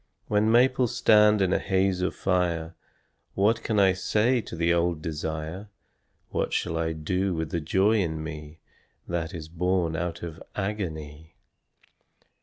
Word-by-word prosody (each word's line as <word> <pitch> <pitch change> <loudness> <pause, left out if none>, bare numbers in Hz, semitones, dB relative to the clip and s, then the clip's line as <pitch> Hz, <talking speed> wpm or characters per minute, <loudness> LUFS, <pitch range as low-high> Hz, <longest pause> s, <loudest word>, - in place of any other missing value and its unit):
When 105 +1 +2
maples 125 0 +3
stand 105 -2 +5
in 95 0 +1
a - - +2
haze 95 -1 +1
of 90 - -1
fire 85 -3 0 0.6
What 110 +4 +2
can 110 -2 0
I 95 -2 +5
say 110 +6 +1
to 95 - -8
the 85 +1 +2
old 85 -1 +1
desire, 80 +4 -4 0.6
What - - -2
shall 80 - -1
I 80 0 -1
do 90 +4 -1
with 80 -1 -3
the 85 - -1
joy 95 +8 +2
in 80 -3 -3
me 75 0 -8 0.5
That 85 -1 -2
is 80 -2 -7
born 85 0 0
out 85 0 -3
of 80 -2 -7
agony? 80 -6 -5
90 Hz, 150 wpm, -26 LUFS, 80-100 Hz, 0.6 s, stand